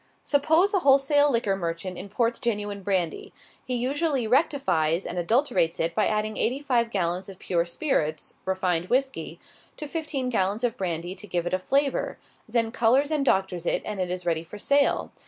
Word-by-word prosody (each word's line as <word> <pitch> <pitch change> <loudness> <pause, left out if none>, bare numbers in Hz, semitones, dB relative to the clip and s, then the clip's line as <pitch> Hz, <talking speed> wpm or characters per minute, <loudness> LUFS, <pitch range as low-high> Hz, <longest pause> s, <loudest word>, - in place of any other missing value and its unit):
Suppose 320 +7 +2
a 390 - +3
wholesale 285 0 +4
liquor 230 -5 +1
merchant 175 0 -4
imports 230 +6 -1
genuine 205 -3 -2
brandy. 185 -4 -1 0.3
He 250 - -2
usually 275 +1 0
"rectifies" 215 - +1
and 175 - -3
adulterates 220 - +1
it 165 +1 0
by 215 +1 +2
adding 215 0 -1
eighty 255 +4 +1
five 245 -5 +1
gallons 185 -2 -1
of 190 - -10
pure 170 -2 0
spirits 165 - -1
(refined 185 -2 0
whisky,) 265 +1 -1 0.4
to 305 - -5
fifteen 295 -4 -3
gallons 210 0 0
of 240 -1 0
brandy, 175 -3 -3
to 210 - -8
give 175 -3 -2
it 175 - -3
a 185 - +2
flavor; 275 +8 0 0.3
then 230 -1 +1
colors 255 +6 +2
and 300 -2 +1
"doctors" 190 -7 0
it, - - +1
and 210 -2 -4
it 180 -1 -1
is 180 0 -3
ready 165 -2 0
for 175 +5 -10
sale. 280 +6 +2
215 Hz, 175 wpm, -26 LUFS, 180-270 Hz, 0.4 s, wholesale